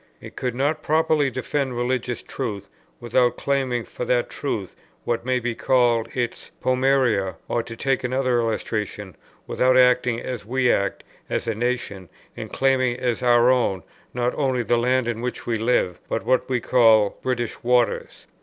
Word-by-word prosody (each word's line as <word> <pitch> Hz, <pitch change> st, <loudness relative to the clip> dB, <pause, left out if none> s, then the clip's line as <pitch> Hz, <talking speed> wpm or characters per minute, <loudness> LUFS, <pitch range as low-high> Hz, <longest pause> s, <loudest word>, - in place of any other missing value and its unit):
It -, -, -12 dB
could 125 Hz, -2 st, -3 dB
not 145 Hz, +4 st, 0 dB
properly 155 Hz, -2 st, +2 dB
defend 130 Hz, 0 st, -2 dB
religious 125 Hz, 0 st, -2 dB
truth, 105 Hz, -7 st, -5 dB, 0.3 s
without 120 Hz, +1 st, +1 dB
claiming 130 Hz, -4 st, 0 dB
for -, -, -6 dB
that 120 Hz, 0 st, 0 dB
truth 105 Hz, -9 st, -4 dB, 0.3 s
what 120 Hz, +1 st, -2 dB
may 130 Hz, 0 st, +2 dB
be 120 Hz, 0 st, -2 dB
called 120 Hz, -2 st, +2 dB
its 120 Hz, -1 st, -3 dB
pom[oe]ria; 130 Hz, -7 st, +1 dB
or, 120 Hz, -, 0 dB
to 115 Hz, 0 st, -9 dB
take 135 Hz, +2 st, -1 dB
another 130 Hz, -1 st, +1 dB
illustration, 105 Hz, -4 st, -3 dB, 0.3 s
without 130 Hz, 0 st, +2 dB
acting 125 Hz, -2 st, +4 dB
as 125 Hz, -2 st, -5 dB
we 125 Hz, +3 st, +1 dB
act, 100 Hz, -, -1 dB, 0.3 s
as -, -, -2 dB
a 115 Hz, -, -1 dB
nation, 115 Hz, -5 st, -3 dB, 0.3 s
in -, -, -7 dB
claiming 130 Hz, -2 st, +1 dB
as 125 Hz, -1 st, -1 dB
our 120 Hz, 0 st, +5 dB
own, 105 Hz, -8 st, +1 dB, 0.3 s
not 125 Hz, 0 st, -1 dB
only 130 Hz, -4 st, 0 dB
the 120 Hz, 0 st, +1 dB
land 125 Hz, 0 st, +1 dB
on 115 Hz, -1 st, -2 dB
which 125 Hz, 0 st, -4 dB
we 115 Hz, -1 st, 0 dB
live, 110 Hz, -6 st, +1 dB
but -, -, -2 dB
what 130 Hz, 0 st, +1 dB
are 125 Hz, -1 st, +1 dB
called 110 Hz, -4 st, +3 dB
British 120 Hz, -3 st, -3 dB
waters. 120 Hz, -2 st, 0 dB
125 Hz, 165 wpm, -23 LUFS, 115-130 Hz, 0.3 s, our